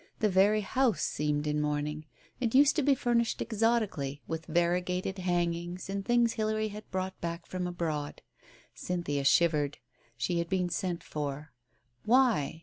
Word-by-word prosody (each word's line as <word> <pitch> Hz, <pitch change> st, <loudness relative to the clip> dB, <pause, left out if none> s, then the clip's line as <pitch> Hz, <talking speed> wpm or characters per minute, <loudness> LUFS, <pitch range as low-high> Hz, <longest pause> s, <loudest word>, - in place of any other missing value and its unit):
The 215 Hz, -, +2 dB
very 200 Hz, +3 st, +4 dB
house 250 Hz, +3 st, +1 dB
seemed 150 Hz, 0 st, -1 dB
in 150 Hz, 0 st, 0 dB
mourning. 150 Hz, +1 st, -2 dB, 0.3 s
It 235 Hz, -1 st, -1 dB
used 285 Hz, +2 st, +6 dB
to -, -, +3 dB
be 280 Hz, 0 st, +4 dB
furnished 235 Hz, -2 st, +1 dB
exotically, 215 Hz, -, 0 dB
with 160 Hz, 0 st, -5 dB
variegated 180 Hz, +2 st, 0 dB
hangings 175 Hz, 0 st, -1 dB
and 200 Hz, 0 st, -2 dB
things 240 Hz, +1 st, +3 dB
Hilary 215 Hz, 0 st, -1 dB
had 210 Hz, +1 st, -10 dB
brought 185 Hz, 0 st, -4 dB
back 170 Hz, 0 st, -4 dB
from 180 Hz, -1 st, -3 dB
abroad. 160 Hz, -4 st, -3 dB, 0.5 s
Cynthia 165 Hz, -6 st, -2 dB
shivered. 150 Hz, -1 st, +3 dB, 0.4 s
She 170 Hz, +9 st, 0 dB
had 170 Hz, -, -2 dB
been 185 Hz, -2 st, 0 dB
sent 175 Hz, 0 st, -2 dB
for. 150 Hz, 0 st, -5 dB, 0.5 s
Why? 230 Hz, -, +3 dB
180 Hz, 145 wpm, -30 LUFS, 155-215 Hz, 0.5 s, used